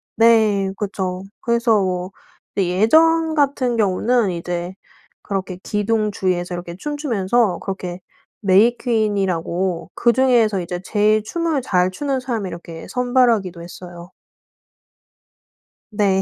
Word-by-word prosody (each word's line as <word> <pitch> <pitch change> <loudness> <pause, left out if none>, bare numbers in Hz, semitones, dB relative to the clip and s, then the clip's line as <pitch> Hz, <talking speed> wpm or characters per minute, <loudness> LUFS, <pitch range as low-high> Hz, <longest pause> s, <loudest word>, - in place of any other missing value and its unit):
네. 215 -4 +4
그쵸. 190 -2 -3 0.2
그래서 235 -3 +2
뭐 185 0 -2 0.4
이 190 -3 +1
예전 320 - +4
같은 275 -5 +1
경우는 220 +2 +2
이제 175 +1 -4 0.5
그렇게 190 -2 -4
기둥 210 0 0
주위에서 180 -2 -1
이렇게 175 -1 -6
춤추면서 235 - 0
그렇게 185 -2 -5 0.4
메이퀸이라고 195 -5 +1
그중에서 235 -5 +3
이제 175 +1 -5
제일 210 +2 +2
춤을 325 0 -1
잘 180 -5 +2
추는 270 +7 -2
사람을 235 -6 -3
이렇게 170 -1 -9
선발하기도 245 -8 +1
했어요. 175 0 -11 1.8
네. 200 -2 +2
205 Hz, 260 characters per minute, -20 LUFS, 185-240 Hz, 1.8 s, 네